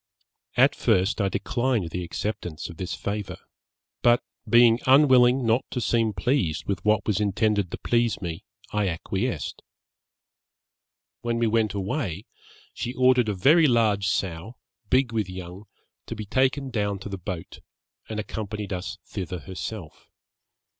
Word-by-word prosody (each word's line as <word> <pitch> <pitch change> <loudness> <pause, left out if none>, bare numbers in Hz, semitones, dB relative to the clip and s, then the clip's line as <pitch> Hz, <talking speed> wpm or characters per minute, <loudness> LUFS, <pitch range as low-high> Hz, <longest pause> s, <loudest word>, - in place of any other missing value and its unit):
At - - +6
first 95 +5 +1
I 100 - +1
declined 120 -6 -1
the 90 +1 -3
acceptance 90 -3 -4
of 85 - -10
this 90 -2 -4
favour, 95 +1 -4 0.6
but 120 0 +4 0.3
being 120 -1 +6
unwilling 130 -2 +6
not 115 +3 +3
to 125 - -3
seem 115 -1 +1
pleased 90 - 0
with 95 -3 -3
what 105 0 +2
was 105 -2 +1
intended 105 -1 +1
to - - -5
please 120 -1 +1
me, 85 -4 -5 0.3
I 105 -1 +1
acquiesced. 95 - -3 1.6
When 120 0 -1
we 115 - +2
went 110 -2 +1
away, 100 - -3 0.5
she 125 +2 -4
ordered 125 -3 +4
a 105 - -1
very 150 - +5
large 110 -5 +2
sow, 95 +3 -2 0.3
big 130 -2 +2
with 105 -4 -1
young, 90 +2 -8 0.4
to - - -5
be 110 -1 -6
taken 130 +4 +1
down 105 -3 -1
to 95 - -8
the 100 -2 -5
boat, 90 -2 -6 0.5
and 110 -1 -3
accompanied 105 -1 -4
us 90 0 -5
thither 90 -2 -5
herself. 95 -2 -7
105 Hz, 145 wpm, -25 LUFS, 95-120 Hz, 1.6 s, At